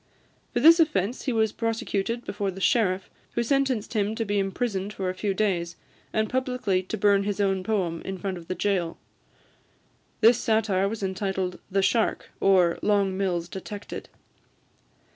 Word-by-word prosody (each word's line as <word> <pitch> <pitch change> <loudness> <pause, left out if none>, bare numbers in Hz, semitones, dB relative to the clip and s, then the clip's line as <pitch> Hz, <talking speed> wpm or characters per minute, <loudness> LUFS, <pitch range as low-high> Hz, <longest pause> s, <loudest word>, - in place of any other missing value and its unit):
For - - 0
this 330 +6 +8
offence 255 - +1
he 265 - +1
was 220 -2 +2
prosecuted 230 0 -2
before 200 -1 -2
the 190 0 -7
sheriff, 190 -3 +2 0.3
who 235 - 0
sentenced 260 -4 0
him 210 0 0
to 225 - -2
be 205 0 0
imprisoned 195 0 -2
for 185 -2 -2
a - - -7
few 195 +1 -2
days, 175 -5 0 0.4
and 220 0 +1
publicly 250 -6 0
to 190 +4 -5
burn 200 -1 +4
his 205 0 -2
own 195 -2 +1
poem 185 -5 -1
in 190 - -4
the 185 - -12
front 190 -3 -3
of 165 - -14
the 185 - -3
jail. 180 -5 -1 1.2
This 230 +2 +6
satire 210 -4 +1
is 220 -2 -5
entitled 190 -1 -2
"The 195 0 +1
Shark; 220 +3 +1
or, 180 -3 +4
Long 200 -2 +2
Mills 180 -3 -1
detected." 200 +3 -7
200 Hz, 165 wpm, -26 LUFS, 190-225 Hz, 1.2 s, this